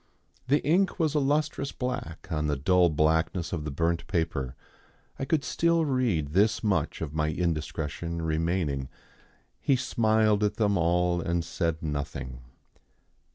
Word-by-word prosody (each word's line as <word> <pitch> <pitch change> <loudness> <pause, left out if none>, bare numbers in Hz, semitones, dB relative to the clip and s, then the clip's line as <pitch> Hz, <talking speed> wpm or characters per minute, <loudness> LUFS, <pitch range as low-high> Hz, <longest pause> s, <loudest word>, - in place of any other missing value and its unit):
The 145 +3 +3
ink 185 +6 +2
was 155 -3 +2
a 150 - +3
lustrous 145 0 0
black 125 - -5
on 75 -1 0
the 75 - +1
dull 90 +5 +3
blackness 80 +3 +1
of 75 -3 -3
the - - -2
burnt 85 +3 -1
paper. 80 -8 -1 0.6
I 135 - -1
could 150 0 +1
still 170 +3 +2
read 120 - 0
this 100 +9 +2
much 105 -3 0
of 75 -3 -4
my 75 0 0
indiscretion 80 0 -2
remaining, 80 -4 -1 0.7
"He 140 - +2
smiled 110 -4 +2
at 105 0 +1
them 105 -2 +2
all 85 0 +2
and 85 0 -1
said 85 -1 -2
nothing." 70 -4 -4
85 Hz, 145 wpm, -28 LUFS, 80-110 Hz, 0.7 s, The